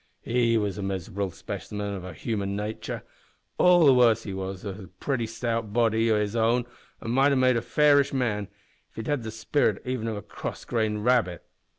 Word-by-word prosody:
He 115 -1 +2
was 105 -2 -1
a - - -3
miserable 95 0 -3
specimen 100 +2 -5
o' 90 - -7
human 100 +3 -3
natur' 105 +2 -4 0.6
all 180 -2 +6
the 135 - +7
worse 115 -3 +4
that - - -7
he - - -5
had 95 +1 -5 0.2
a - - -15
pretty 125 -5 -1
stout 115 -2 -3
body 115 -1 +2
o' 105 - +3
his 105 +1 -2
own, 115 +2 +2 0.4
an' 115 - -3
might 135 +3 +4
have 140 - +2
made 130 -1 +4
a 115 - +1
fairish 145 +2 +4
man 110 -7 -1 0.4
if - - -36
he'd 110 - -5
had 145 -2 0
the 110 - -5
spirit 110 +5 0
even 125 -3 -2
of 110 -2 -2
a 105 - -7
cross - - -7
grained 110 -2 -1
rabbit. 115 -9 +2
115 Hz, 200 wpm, -26 LUFS, 105-125 Hz, 0.6 s, the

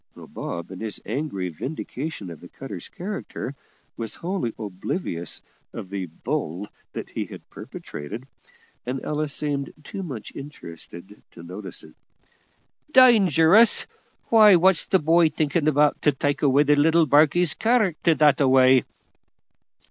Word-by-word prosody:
(Bob, 85 +2 -7
in 95 - -8
his 110 -2 -3
angry 110 -6 -3
vindication 130 - -6
of 80 - -10
the 90 - -12
cutter's 100 -5 -8
character, 190 -7 -6 0.4
was 115 -2 -5
wholly 175 -9 -3
oblivious 95 - -4 0.3
of 95 - -8
the 95 -2 -4
"bull" 85 +3 -4 0.5
he - - -3
had - - -12
perpetrated, 100 - -8 0.6
and 130 +2 -3
Ella 150 0 -1
seemed 145 -1 -2
too 195 +7 -7
much 135 - -7
interested 95 - -10
to 85 - -13
notice 95 +2 -7
it.) - - -15 1.0
"Dangerous! 215 - +6 0.4
why, 215 -4 +7
what's 180 0 +3
the 190 - +4
boy 165 0 +3
thinking 155 0 -1
about, 150 0 +2
to 150 - +4
take 140 +1 -2
away 140 0 +4
the 150 0 +3
little 160 +3 +4
barkie's 155 +3 +4
character 200 -8 +1
that 150 -2 +4
a 140 - +4
way?" 130 -1 +5
145 Hz, 135 wpm, -24 LUFS, 105-165 Hz, 1.0 s, why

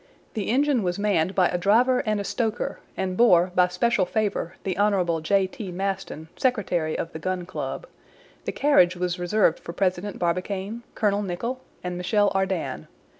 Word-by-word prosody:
The 210 -3 -3
engine 275 +1 +2
was 180 -2 -1
manned 195 -3 +1
by 180 -2 +4
a 175 - -1
driver 245 +7 +4
and 215 -1 +1
a - - -2
stoker, 225 +2 -2 0.2
and 185 -1 -1
bore, 185 -5 +5
by 180 -1 +4
special 195 +4 +1
favor, 205 -4 -1
the 190 -2 -2
Hon. 185 -5 +1
J. 195 +4 +2
T. 190 0 -7
Maston, 190 -4 -4
secretary 180 -11 0
of 165 - -4
the 160 - -6
Gun 185 +1 -2
Club. - - -5 0.6
The - - -1
carriage 185 -12 +4
was 180 0 -2
reserved 175 -1 +2
for 170 - -8
President 185 +2 -1
Barbicane, 190 +5 -2
Colonel 205 -1 +1
Nicholl, 230 +7 -3 0.2
and 180 -1 -3
Michel 200 +3 +2
Ardan. 190 -2 -2
190 Hz, 170 wpm, -25 LUFS, 180-210 Hz, 0.6 s, bore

